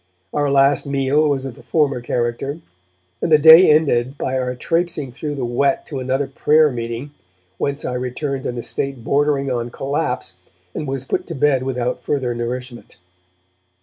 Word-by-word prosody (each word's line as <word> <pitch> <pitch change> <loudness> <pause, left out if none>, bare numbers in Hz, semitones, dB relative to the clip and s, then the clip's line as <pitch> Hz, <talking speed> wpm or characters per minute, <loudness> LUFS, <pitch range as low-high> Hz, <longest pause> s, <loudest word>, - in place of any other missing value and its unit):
Our 145 -1 +1
last 140 +1 +3
meal 140 +2 +2
was 135 -2 -1
of 135 - -5
the - - -15
former 140 -6 0
character, 120 +4 -2 0.6
and - - -1
the 155 - +8
day 160 +4 +9
ended 140 -4 +2
by 130 - -2
our 125 0 -2
trapesing 165 -1 -1
through 145 +3 -5
the 130 -3 -3
wet 135 +3 0
to 140 - -5
another 130 +2 -1
prayer 150 +3 +3
meeting, 120 +3 -5 0.5
whence 140 +1 -2
I - - -2
returned 130 +2 -3
in 120 - -4
a 120 - -4
state 135 -4 -4
bordering 140 0 +1
on 120 -1 -2
collapse 135 - -3 0.4
and 150 - -4
was 135 -1 -4
put - - -2
to 165 - -5
bed 135 -1 +2
without 125 -1 -2
further 130 -4 -1
nourishment. 120 +1 -6
135 Hz, 170 wpm, -20 LUFS, 125-145 Hz, 0.6 s, day